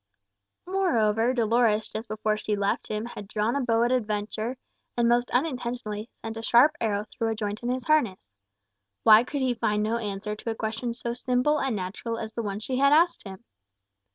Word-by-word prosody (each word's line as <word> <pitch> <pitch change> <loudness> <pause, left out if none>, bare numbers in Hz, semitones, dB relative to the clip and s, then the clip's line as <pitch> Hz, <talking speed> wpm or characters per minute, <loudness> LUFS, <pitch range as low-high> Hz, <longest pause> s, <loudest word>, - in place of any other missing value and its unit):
Moreover, 240 - +2
Dolores, 230 -2 +2
just 220 +1 -6
before 215 0 -1
she 215 0 -2
left 200 0 -1
him, 215 +1 -3
had 210 -4 -8
drawn 215 +3 -1
a 280 - +1
bow 230 -2 +2
at 240 - +1
a 255 - +4
venture, 215 +3 -3 0.4
and 235 -1 +3
most 240 +1 +2
unintentionally 245 -5 -2
sent 225 0 -5
a - - -4
sharp 240 +6 +5
arrow 210 -2 0
through 225 - -1
a 225 - -1
joint 210 -1 -4
in 240 - -3
his 250 -1 -2
harness. 215 - +1 0.7
Why 220 +1 +8
could 280 +2 -4
he 255 -1 +2
find 215 -2 0
no 225 +2 0
answer 210 -1 -4
to 220 - -6
a 225 - -2
question 225 +2 -3
so 235 -1 -4
simple 250 +4 +1
and 270 -4 -1
natural 205 +5 -4
as 220 -1 -6
the 230 - -3
one 200 -2 -3
she 255 +4 -3
had 280 +1 +4
asked 335 0 +3
him? 190 -1 -10
225 Hz, 200 wpm, -26 LUFS, 215-250 Hz, 0.7 s, Why